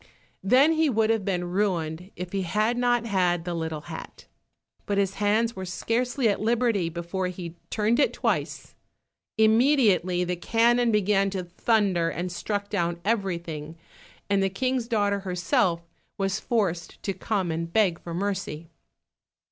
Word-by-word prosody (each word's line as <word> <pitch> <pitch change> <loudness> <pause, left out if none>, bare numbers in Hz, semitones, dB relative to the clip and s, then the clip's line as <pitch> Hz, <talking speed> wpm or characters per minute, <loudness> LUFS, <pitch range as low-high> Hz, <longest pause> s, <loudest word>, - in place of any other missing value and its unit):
Then 255 +10 +5
he 320 -1 +2
would 225 -2 +2
have 225 -3 0
been 180 -2 -1
ruined 180 -3 -1
if 180 0 -6
he 195 - -1
had 215 +6 +1
not 240 -1 +1
had 180 -5 +1
the 175 - -2
little 160 -2 -3
hat. - - -9 0.6
But 200 - 0
his 195 -1 +1
hands 220 +3 +2
were 190 - -5
scarcely 240 +7 -1
at 205 - 0
liberty 225 -5 +1
before 175 +3 -3
he 175 -2 -7
turned 220 +4 +1
it 290 - +4
twice. - - -2 0.6
Immediately 220 - +4
the 180 0 -1
cannon 235 +5 +2
began 200 -1 +2
to 190 -1 -3
thunder, 180 -1 +1
and 180 +2 -4
struck 200 +3 -3
down 175 -4 -1
everything, 170 -7 -2 0.5
and 200 -1 +2
the 195 - +2
King's 255 +4 -1
daughter 205 -3 +1
herself 175 -2 0 0.3
was 195 +1 -1
forced 180 -8 -2
to 195 - -1
come 190 -4 -2
and 165 +1 -3
beg 190 -5 +2
for 170 -1 -6
mercy. 185 -4 -3
195 Hz, 150 wpm, -26 LUFS, 175-225 Hz, 0.6 s, Then